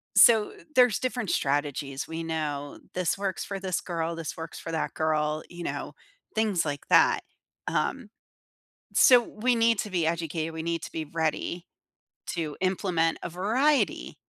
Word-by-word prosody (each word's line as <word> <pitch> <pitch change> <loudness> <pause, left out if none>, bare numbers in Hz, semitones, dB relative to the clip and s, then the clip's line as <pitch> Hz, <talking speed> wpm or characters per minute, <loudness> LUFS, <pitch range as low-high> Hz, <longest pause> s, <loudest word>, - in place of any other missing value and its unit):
so 220 -3 +7
th 415 -4 -17
there's 245 -4 +5
different 245 -5 -2
strategies. 140 -1 -1
We 165 +1 -4
know 150 -3 -3
this 180 0 0
works 195 -2 -2
for 195 -1 -4
this 185 -2 -1
girl. 165 -1 -2
This 165 -2 -5
works 160 0 -7
for - - -7
that 160 - -1
girl, 155 -1 0
you 175 0 -8
know, - - -4 0.4
things 210 -6 +1
like 145 -1 -4
that. - - +5 0.5
Um, 255 -6 -1 0.9
so, 250 -2 +8
we 240 +3 0
need 230 -1 +3
to 210 - -5
be 175 -4 +1
educated. 165 -1 -2
We 160 - -4
need 170 0 -1
to - - -7
be 160 - -3
ready 165 +2 -2 0.7
to 155 -4 -3
implement 180 -3 +1
a - - -3
variety 245 - +1
170 Hz, 160 wpm, -27 LUFS, 160-210 Hz, 0.9 s, so